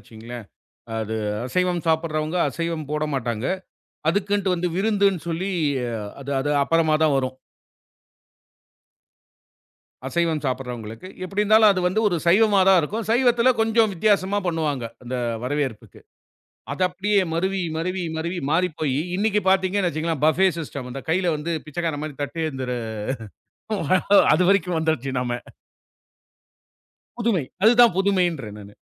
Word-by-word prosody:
வச்சுக்குங்ளேன். 115 +2 -10 0.5
அது 110 0 -3 0.3
அசைவம் 180 +4 0
சாப்பிடுறவங்க, 160 +1 0
அசைவம் 165 -3 -4
போடமாட்டாங்க. 135 -7 -2 0.6
அதுக்குன்ட்டு 200 +1 +1
வந்து 175 +1 -1
விருந்துன்னு 200 -3 +2
சொல்லி 175 +4 -2 0.7
அது 140 - -7
அது 145 - -1
அப்புறமா 160 +1 +2
தான் 155 -3 +3
வரும். 130 -1 -2 2.7
அசைவம் 165 +1 0
சாப்பிடுறவங்களுக்கு. 125 +1 -5 0.2
எப்டி 200 +3 -1
இருந்தாலும், 215 0 +6
அது 185 - -1
வந்து 195 +4 0
ஒரு 175 - +1
சைவமா 200 +2 +5
தான் 190 -2 +6
இருக்கும். 215 +8 -3
சைவத்தில 245 +1 +4
கொஞ்சம் 225 -1 +3
வித்தியாசமா 200 +1 +2
பண்ணுவாங்க, 155 -6 -1 0.2
அந்த 125 +1 -4 0.3
வரவேற்புக்கு. 130 -4 -3 0.7
அது 185 - -3
அப்டியே 195 +3 +1
மருவி, 190 +2 0
மருவி, 180 +2 -2
மருவி 170 +3 -3
மாறிப்போய்யி, 155 -5 0 0.2
இன்னிக்கு 210 +1 +1
பார்த்தீங்கனு 190 0 +2
வெச்சுகங்களேன், 155 -1 -3
பஃபே 185 +5 +4
சிஸ்டம். 140 -5 -6
அந்த 135 - -5
கைல 175 +1 +1
வந்து 155 +3 -3
பிச்சைக்காரன் 155 -1 -3
மாரி 155 - -6
தட்டேந்துற 140 -5 -4 1.6
அது 180 - +3
வரைக்கும் 180 -3 +2
வந்துருச்சு 160 -5 -1
நாம. 125 -1 -2 1.9
புதுமை! 220 - +1 0.2
அதுதான் 235 -2 +6
புதுமைன்றேன் 175 - 0
நானு. 100 0 -12
170 Hz, 115 wpm, -23 LUFS, 145-195 Hz, 2.7 s, இருந்தாலும்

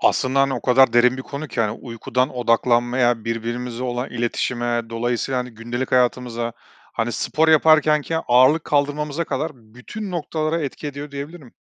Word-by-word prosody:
Aslında 135 0 +2
hani 135 -1 +2
o 125 - -5
kadar 130 -1 +5
derin 125 +2 +4
bir 130 - -6
konu 140 +3 -6
ki, 120 - -2
hani, 105 -2 +1
uykudan 125 +1 -2
odaklanmaya, 120 0 +2
birbirimize 120 +1 -4
olan 125 0 -3
iletişime, 120 0 -1
dolayısıyla, 120 +2 -1
hani, 125 0 -6
gündelik 120 +3 -5
hayatımıza, 120 -2 +1 0.4
hani, 115 +1 -2
spor 160 +6 +1
yaparkenkenki 155 0 +4
ağırlık 130 +6 +5
kaldırmamıza 150 +2 0
kadar 160 0 -2
bütün 125 - -9
noktalara 160 -1 -2
etki 145 +1 -5
ediyor 145 +1 -6
diyebilirim. 140 0 -8
125 Hz, 150 wpm, -21 LUFS, 120-145 Hz, 0.4 s, kadar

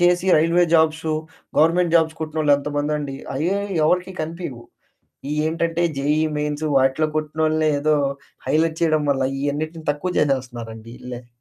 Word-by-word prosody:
చేసి 175 +1 +3
railway 165 +3 +4
jobs, 160 0 +3 0.5
government 165 +2 +3
jobs 160 -1 +1
కొట్టినోళ్లు 155 -2 +1
ఎంతమందండి. 145 0 -2 0.2
అయ్యే 175 +8 0 0.3
ఎవరికీ 180 +3 +1
కనిపియవు. 155 -7 -5 0.7
ఇయేంటంటే 165 +2 0
జేఈఈ 150 +3 +1
మెయిన్స్ 150 +1 -2
వాటిలో 135 +4 +2
కొట్టినోళ్ళనే 155 0 +1
ఏదో 155 +1 +2 0.5
హైలైట్ 160 +3 +1
చేయడం 155 -2 +2
వల్ల 135 -1 +1 0.2
ఇయన్నిటిని 155 +3 -3
తక్కువ 150 +5 -4
చేసేస్తున్నారండి 120 -5 -2
ఈళ్ళే. 125 -1 -8
155 Hz, 120 wpm, -22 LUFS, 145-165 Hz, 0.7 s, railway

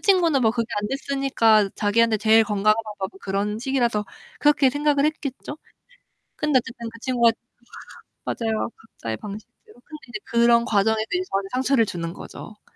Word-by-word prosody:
친구는 340 -9 +3
뭐 220 - +4
그게 230 0 -2
안 210 - -3
됐으니까 265 -7 +2
자기한테 220 +2 +2
제일 220 +1 +5
건강한 215 -1 +2
방법은 200 -2 -6
그런 205 +2 -2
식이라서 240 -5 0 0.4
그렇게 295 -2 +4
생각을 290 0 +1
했겠죠. 295 -1 -4 0.8
그런데 300 -3 +2
어쨌든 235 -1 -6
그 230 - -13
친구가 235 -2 +3 0.9
맞아요. 225 -2 -2
각자의 115 - -7
방식대로. 210 +3 -11
근데 305 -2 -10
이제 215 - -5
그런 235 0 +3
과정에서 220 +1 +2
이제 360 - +1
저한테 195 0 -2
상처를 255 -2 +2
주는 170 -3 -5
거죠. 210 -1 -11
230 Hz, 375 characters per minute, -23 LUFS, 210-270 Hz, 0.9 s, 제일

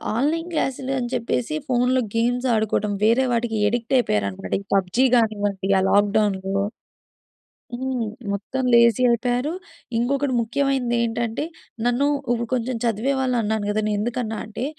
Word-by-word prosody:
Online 320 +8 0
క్లాస్‌లని 265 -4 -1
చెప్పేసి 245 +5 -1
ఫోన్‌లో 250 +1 +2
games 245 +3 +1
ఆడుకోవడం 210 -1 0
వేరే 235 +4 +4
వాటికి 230 -2 0
అడిక్టయిపోయారన్నమాట. 225 - 0
ఈ - - -13
'పబ్‌జీ' 195 +7 +2
కానివ్వండి 205 -4 0
ఆ - - +1
లాక్‌డౌన్‌లో 200 -1 +2 1.1
హ్మ్. 250 -1 -2 0.3
మొత్తం 235 +6 -3
లేజీ 235 0 +5
అయిపోయారు. 245 +5 0 0.4
ఇంకొకటి 270 +3 0
ముఖ్యమైనది 250 +1 0
ఏంటంటే 230 +1 -2 0.4
నన్ను 245 +4 +2 0.2
ఇప్పుడు 235 -1 -1
కొంచెం 250 0 -1
చదివేవా‌ళ్ళు 250 +3 0
అన్నాను 215 -1 -1
కదా! 210 +1 0
నేను 210 - 0
ఎందుకున్నా 225 0 -2
అంటే, 220 +3 -5
235 Hz, 120 wpm, -23 LUFS, 215-255 Hz, 1.1 s, లేజీ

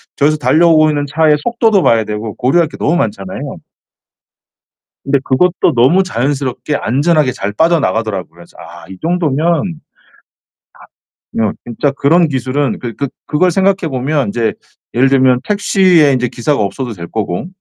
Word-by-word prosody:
저기서 150 +2 +2
달려오고 155 0 +4
있는 145 -1 -1
차의 150 +1 +2
속도도 225 -5 +2
봐야 115 -1 +3
되고 105 0 -5
고려할 160 +6 +2
게 - - -11
너무 165 - 0
많잖아요. 100 - -4 1.5
근데 140 0 +1
그것도 180 +8 +1
너무 140 +11 +4
자연스럽게 140 -2 -2
안전하게 145 +2 +1
잘 105 -4 -4
빠져나가더라고요. 110 - 0
그래서 85 0 -17
'아 - - -12
이 95 - -10
정도면' 165 -5 0
아 170 -1 -1 1.6
어 110 -2 +1 0.2
진짜 120 +5 -1
그런 160 +5 +2
기술은 130 -1 -2
그 120 -2 -6
그 140 - -2 0.2
그걸 180 +4 +2
생각해 190 -2 +1
보면 135 0 -1
인제 115 +2 -1 0.4
예를 130 +3 +3
들면 130 -2 +3
택시에 190 -7 +3
인제 125 -1 0
기사가 125 +3 -1
없어도 120 +5 -3
될 85 -4 -8
거고 100 - -3
140 Hz, 335 characters per minute, -14 LUFS, 120-165 Hz, 1.6 s, 달려오고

